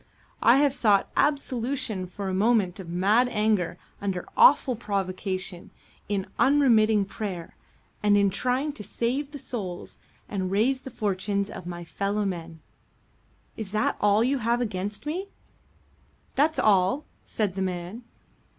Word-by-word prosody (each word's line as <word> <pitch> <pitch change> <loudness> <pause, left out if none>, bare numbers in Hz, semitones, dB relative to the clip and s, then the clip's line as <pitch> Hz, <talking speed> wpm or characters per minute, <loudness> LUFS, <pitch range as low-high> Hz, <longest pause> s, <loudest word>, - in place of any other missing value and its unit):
I 240 +3 +6
have 280 -1 +3
sought 210 -7 +2
absolution 255 -7 0
for 195 +2 -6
a 190 - -2
moment 200 -2 +2
of 180 -3 -8
mad 205 +8 +3
anger 210 -6 +1 0.2
under 190 -3 -3
awful 465 - +6
provocation 190 -3 -3 0.4
in 200 -2 -1
unremitting 225 -7 +4
prayer 190 -5 -6 0.5
and 205 -1 +4
in 200 -1 +3
trying 255 +7 -1
to 210 - -9
save 255 +7 -2
the 295 - -8
souls 210 -9 -6 0.3
and 190 -3 -2
raise 240 +7 +1
the 265 - -8
fortunes 200 -2 -2
of 175 - -8
my 175 -1 -6
fellow 200 +4 -2
men. 165 -4 -5 0.9
Is 220 -3 -5
that 215 0 +1
all 205 +2 +4
you 270 +2 +1
have 235 +1 +1
against 205 0 -3
me?" 355 +6 -3 1.1
"That's 310 +3 +2
all," 210 +7 +3 0.2
said 210 -4 -2
the 190 - -4
man. 185 +4 -4
210 Hz, 140 wpm, -26 LUFS, 190-250 Hz, 1.1 s, I